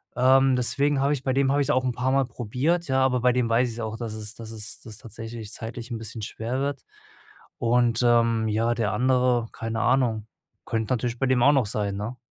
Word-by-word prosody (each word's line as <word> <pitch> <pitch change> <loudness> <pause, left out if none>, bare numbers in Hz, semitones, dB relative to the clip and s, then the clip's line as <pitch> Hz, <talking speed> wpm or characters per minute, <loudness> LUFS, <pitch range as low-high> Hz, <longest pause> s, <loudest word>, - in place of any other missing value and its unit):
ähm 130 +1 +4
deswegen 140 +3 +1
habe 140 +2 +2
ich 135 -2 -4
bei 130 - 0
dem 135 0 +2
habe 145 +1 +2
ich's 140 - -1
auch 130 -3 +2
'n 125 - +1
paarmal 130 +2 +1
probiert, 130 +9 -1
ja, 130 0 +2
aber 125 -1 +2
bei 125 0 +4
dem 125 -2 +1
weiß 120 +2 +2
ich's 115 +1 -7
auch, 110 0 -4
dass 115 -3 -5
es 110 0 -6
dass 115 -1 -9
es 110 -1 -6
dass 110 - -10
es - - -4
tatsächlich 115 -1 -8
zeitlich 115 +1 -7
'n 115 - -2
bisschen 110 0 -7
schwer 115 +5 -4
wird. 140 +1 -2 0.8
Und, 120 0 +2
ähm, 115 -2 +3
ja, 115 +2 +1
der 110 -4 -1
andere, 125 0 +2
keine 115 0 -4
Ahnung. 120 -3 +1 0.4
Könnte 115 +1 -1
natürlich 120 0 -2
bei 135 - +1
dem 130 -1 +2
auch 145 - +7
noch 135 -5 +3
sein, 100 -1 -2
ne? 115 +5 -5
120 Hz, 225 wpm, -25 LUFS, 115-130 Hz, 0.8 s, auch